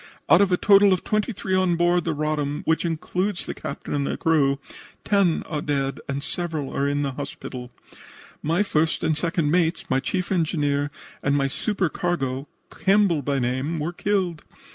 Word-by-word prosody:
Out -, -, +6 dB
of 200 Hz, -2 st, +3 dB
a 180 Hz, -, +4 dB
total 200 Hz, 0 st, +6 dB
of 185 Hz, -, -1 dB
twenty 215 Hz, +3 st, 0 dB
three 190 Hz, -2 st, -4 dB
on 185 Hz, -2 st, +3 dB
board 175 Hz, +1 st, +2 dB
the 165 Hz, -2 st, -1 dB
Roddam, 150 Hz, -1 st, -1 dB
which 160 Hz, +2 st, +1 dB
includes 180 Hz, +4 st, -2 dB
the -, -, -4 dB
captain -, -, -6 dB
and 140 Hz, -1 st, 0 dB
the -, -, -2 dB
crew, 145 Hz, -4 st, +2 dB, 0.5 s
ten 195 Hz, -5 st, +2 dB
are 150 Hz, -3 st, -4 dB
dead 140 Hz, -2 st, -1 dB
and 140 Hz, +1 st, -2 dB
several 160 Hz, -5 st, -3 dB
are 140 Hz, -, +1 dB
in 145 Hz, 0 st, 0 dB
the 140 Hz, -, -1 dB
hospital. 130 Hz, -2 st, -7 dB, 0.7 s
My 165 Hz, +6 st, +1 dB
first 160 Hz, -4 st, 0 dB
and 160 Hz, -1 st, +2 dB
second 165 Hz, -1 st, 0 dB
mates, 170 Hz, -3 st, +1 dB
my 130 Hz, -, +3 dB
chief 180 Hz, +8 st, -2 dB
engineer 145 Hz, -5 st, +1 dB, 0.3 s
and 140 Hz, +1 st, +2 dB
my 140 Hz, -, +2 dB
supercargo, 160 Hz, -, -1 dB, 0.2 s
Campbell 195 Hz, -5 st, +3 dB
by 140 Hz, +1 st, -1 dB
name, 130 Hz, +6 st, -1 dB
were 160 Hz, +3 st, -2 dB
killed. 185 Hz, -4 st, -1 dB
160 Hz, 175 wpm, -24 LUFS, 145-180 Hz, 0.7 s, Out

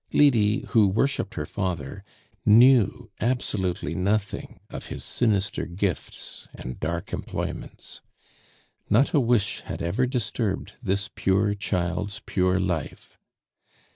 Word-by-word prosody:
Lydie, 115 Hz, -5 st, +4 dB
who 110 Hz, -4 st, +5 dB
worshiped 110 Hz, +1 st, 0 dB
her 75 Hz, -, -2 dB
father, 90 Hz, 0 st, -3 dB, 0.4 s
knew 115 Hz, 0 st, +5 dB
absolutely 105 Hz, -6 st, -1 dB
nothing 100 Hz, +2 st, -1 dB
of -, -, -7 dB
his -, -, -6 dB
sinister 100 Hz, -5 st, 0 dB
gifts 90 Hz, -1 st, -4 dB
and 65 Hz, 0 st, -7 dB
dark 85 Hz, +2 st, -3 dB
employments. -, -, -5 dB, 0.9 s
Not 120 Hz, +7 st, +4 dB
a 150 Hz, -, +5 dB
wish 115 Hz, -4 st, +1 dB
had -, -, -5 dB
ever 105 Hz, +10 st, +1 dB
disturbed 115 Hz, -4 st, -2 dB
this 100 Hz, +2 st, 0 dB
pure 100 Hz, -1 st, +1 dB
child's 100 Hz, +1 st, -2 dB
pure 90 Hz, -1 st, +2 dB
life. 90 Hz, -5 st, -3 dB
100 Hz, 110 wpm, -26 LUFS, 90-115 Hz, 0.9 s, who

